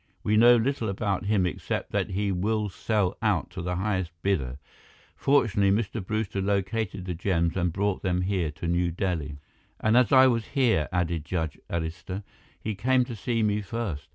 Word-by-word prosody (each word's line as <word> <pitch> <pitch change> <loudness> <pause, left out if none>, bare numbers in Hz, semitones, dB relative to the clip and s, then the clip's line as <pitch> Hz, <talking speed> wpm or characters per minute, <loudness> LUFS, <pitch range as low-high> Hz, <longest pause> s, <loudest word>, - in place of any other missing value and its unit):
We 105 - +2
know 120 +3 +7
little 120 -1 0
about 100 -1 -1
him, 100 -3 +2
except 90 - -3
that - - 0
he 100 +1 -1
will 105 +3 0
sell 100 -1 0
out 105 -7 +1
to 95 - -6
the 90 +1 -2
highest 95 -2 -1
bidder. 70 -10 0 0.6
Fortunately, 105 -8 +3
Mr. 105 +1 0
Brewster 105 -1 -2
located 100 0 -1
the 90 - -3
gems 85 -1 0
and 90 -2 +1
brought 100 +2 -1
them 90 -1 0
here 90 -3 0
to 75 +3 -6
New 85 +1 +1
Delhi." 85 -5 -2 0.4
"And 110 +1 +2
as 125 +2 +4
I 130 -1 +8
was 120 -3 +2
here," 115 - +3
added 85 -3 -1
Judge 80 -2 -3
Arista, 85 +4 -4 0.4
"he 110 - -3
came 125 +4 +2
to 120 - -6
see 115 +2 -1
me 105 0 +1
first. 95 -9 -4
100 Hz, 180 wpm, -27 LUFS, 90-110 Hz, 0.6 s, I